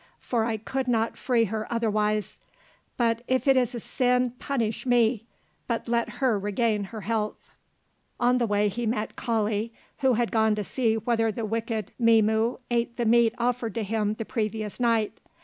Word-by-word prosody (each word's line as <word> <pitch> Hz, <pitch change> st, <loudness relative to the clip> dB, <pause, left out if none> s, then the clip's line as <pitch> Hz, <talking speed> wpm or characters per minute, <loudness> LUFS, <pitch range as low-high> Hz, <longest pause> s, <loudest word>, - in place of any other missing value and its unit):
For 230 Hz, -3 st, -1 dB
I 225 Hz, -1 st, -1 dB
could 265 Hz, +4 st, -3 dB
not 230 Hz, -2 st, +1 dB
free 240 Hz, -3 st, +1 dB
her 215 Hz, +2 st, -4 dB
otherwise; 215 Hz, -2 st, 0 dB, 0.6 s
but 230 Hz, -1 st, +1 dB
if 260 Hz, +2 st, 0 dB
it 270 Hz, -, +6 dB
is 250 Hz, -1 st, +1 dB
a -, -, -3 dB
sin, 250 Hz, +1 st, +1 dB
punish 230 Hz, -6 st, -2 dB
me, 235 Hz, -2 st, +2 dB, 0.4 s
but 235 Hz, -1 st, -2 dB
let 235 Hz, 0 st, 0 dB
her 225 Hz, -5 st, +3 dB
regain 205 Hz, +1 st, 0 dB
her 220 Hz, +2 st, -8 dB
health." 215 Hz, +1 st, -3 dB, 0.7 s
On 245 Hz, +1 st, +3 dB
the 235 Hz, -, +1 dB
way 205 Hz, 0 st, +2 dB
he 230 Hz, +4 st, -2 dB
met 215 Hz, -1 st, -2 dB
Kali, 220 Hz, -2 st, -1 dB, 0.3 s
who 265 Hz, -2 st, +3 dB
had 235 Hz, 0 st, 0 dB
gone 220 Hz, -1 st, +3 dB
to 210 Hz, -, -2 dB
see 225 Hz, +1 st, 0 dB
whether 225 Hz, 0 st, +1 dB
the 225 Hz, +1 st, -4 dB
wicked 225 Hz, -1 st, -3 dB
Mzimu 225 Hz, 0 st, +3 dB
ate 235 Hz, 0 st, 0 dB
the 240 Hz, -, 0 dB
meat 230 Hz, 0 st, +4 dB
offered 240 Hz, -2 st, -1 dB
to 225 Hz, -, -1 dB
him 210 Hz, 0 st, -1 dB
the 225 Hz, -, -5 dB
previous 215 Hz, -2 st, -3 dB
night. 230 Hz, -3 st, +1 dB
230 Hz, 175 wpm, -26 LUFS, 215-240 Hz, 0.7 s, it